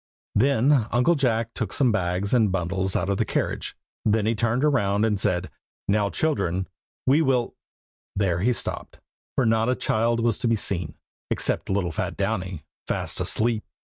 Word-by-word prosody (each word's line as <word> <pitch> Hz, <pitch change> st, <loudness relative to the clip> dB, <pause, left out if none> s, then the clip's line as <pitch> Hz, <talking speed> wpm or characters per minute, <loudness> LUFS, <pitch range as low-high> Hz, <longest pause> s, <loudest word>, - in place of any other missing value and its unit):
Then 130 Hz, +1 st, +3 dB
Uncle 125 Hz, +8 st, +4 dB
Jack 115 Hz, -6 st, 0 dB
took 110 Hz, -5 st, -3 dB
some 130 Hz, -4 st, +3 dB
bags 95 Hz, 0 st, -1 dB
and 110 Hz, -5 st, +4 dB
bundles 95 Hz, +1 st, -1 dB
out 90 Hz, -, 0 dB
of 100 Hz, -1 st, 0 dB
the -, -, +2 dB
carriage; -, -, -2 dB, 0.3 s
then 110 Hz, 0 st, +2 dB
he 110 Hz, -, +2 dB
turned 115 Hz, +3 st, 0 dB
round 105 Hz, -8 st, +2 dB
and 105 Hz, -3 st, +1 dB
said 90 Hz, -3 st, -1 dB, 0.4 s
"Now, 100 Hz, 0 st, +2 dB
children, 95 Hz, -, 0 dB, 0.4 s
we 140 Hz, +5 st, +4 dB
will" 130 Hz, -5 st, +1 dB, 0.6 s
There 95 Hz, -4 st, +1 dB
he 115 Hz, +7 st, +2 dB
stopped, 120 Hz, -, -4 dB, 0.4 s
for 130 Hz, -, +2 dB
not 115 Hz, +1 st, +2 dB
a 130 Hz, -, +2 dB
child 115 Hz, +1 st, +1 dB
was 115 Hz, -2 st, +1 dB
to -, -, 0 dB
be 115 Hz, -, +3 dB
seen, 90 Hz, -7 st, -3 dB, 0.3 s
except -, -, -1 dB
little 95 Hz, -3 st, 0 dB
fat -, -, -3 dB
Downy, 95 Hz, -5 st, -2 dB, 0.2 s
fast -, -, -2 dB
asleep. 110 Hz, -1 st, +1 dB
110 Hz, 165 wpm, -25 LUFS, 95-120 Hz, 0.6 s, Uncle